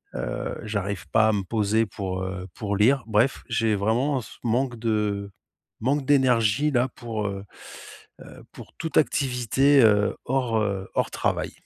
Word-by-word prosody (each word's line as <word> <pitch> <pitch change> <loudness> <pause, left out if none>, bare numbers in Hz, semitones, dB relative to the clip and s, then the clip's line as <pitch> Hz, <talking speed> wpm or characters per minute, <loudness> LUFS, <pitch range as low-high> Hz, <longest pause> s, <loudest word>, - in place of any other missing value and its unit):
heu, - - -4
j'arrive 100 -3 -3
pas 110 0 +4
à - - +2
me 100 -2 -1
poser 110 +2 +1
pour, 95 -1 -4
heu, 95 0 -5
pour 100 -2 -2
lire 130 +5 +3
bref, 110 +5 +1
j'ai 115 -2 +1
vraiment 120 +7 0
ce - - -13
manque 125 +1 0
de 105 -3 -1 0.5
manque 135 +3 0
d'énergie 130 0 +3
là 125 0 +2
pour, 110 -4 -4
heu 100 0 -5 0.8
heu, - - -13
pour - - -12
toute 160 - -5
activité, 135 -1 +3
heu, 105 -2 +3
hors 120 -4 0 0.3
hors - - 0
travail. - - -1
110 Hz, 150 wpm, -25 LUFS, 105-130 Hz, 0.8 s, pas